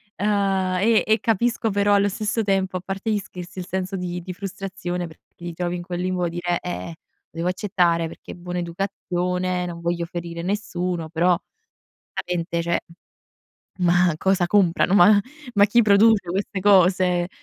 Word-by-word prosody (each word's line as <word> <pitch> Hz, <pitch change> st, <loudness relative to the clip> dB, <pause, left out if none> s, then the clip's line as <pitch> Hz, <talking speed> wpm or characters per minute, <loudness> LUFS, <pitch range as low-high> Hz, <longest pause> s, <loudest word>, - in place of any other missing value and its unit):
ehm, 195 Hz, -2 st, +1 dB
e 220 Hz, +2 st, +4 dB
e 220 Hz, +1 st, +3 dB
capisco 225 Hz, 0 st, 0 dB
però 205 Hz, +1 st, +2 dB
allo 200 Hz, 0 st, +3 dB
stesso 215 Hz, +3 st, -1 dB
tempo, 190 Hz, -2 st, 0 dB
a -, -, -7 dB
parte 195 Hz, +3 st, -3 dB
gli 210 Hz, -, +2 dB
scherzi, 180 Hz, -1 st, -8 dB
il 180 Hz, -, -5 dB
senso 190 Hz, 0 st, -3 dB
di 180 Hz, -1 st, -4 dB
di 180 Hz, +1 st, -7 dB
frustrazione 185 Hz, -2 st, -5 dB
perché 160 Hz, -, -19 dB
ti 175 Hz, -1 st, -7 dB
trovi 175 Hz, +1 st, -2 dB
in -, -, -6 dB
quel 175 Hz, 0 st, -5 dB
limbo, 180 Hz, -2 st, -1 dB
dire: 175 Hz, 0 st, -2 dB
"Eh, 175 Hz, -2 st, -5 dB, 0.4 s
devo 165 Hz, +2 st, -3 dB
accettare 180 Hz, -3 st, +1 dB
perché -, -, -10 dB
è -, -, -11 dB
buona 175 Hz, 0 st, -5 dB
educazione, 180 Hz, 0 st, -2 dB
non 170 Hz, -1 st, -6 dB
voglio 170 Hz, 0 st, -1 dB
ferire 170 Hz, -1 st, -6 dB
nessuno," 180 Hz, -4 st, -2 dB
però 175 Hz, +2 st, +3 dB, 0.8 s
veramente, 170 Hz, -1 st, -2 dB
cioè, 170 Hz, 0 st, 0 dB, 1.0 s
"ma 175 Hz, -1 st, +3 dB
cosa 190 Hz, 0 st, +2 dB
comprano? 185 Hz, -1 st, +3 dB
Ma 205 Hz, +2 st, +7 dB, 0.3 s
ma 200 Hz, 0 st, +6 dB
chi 235 Hz, +3 st, +4 dB
produce 205 Hz, -2 st, +4 dB
queste 195 Hz, +1 st, -2 dB
cose? 185 Hz, -2 st, +4 dB
180 Hz, 160 wpm, -23 LUFS, 175-200 Hz, 1.0 s, Ma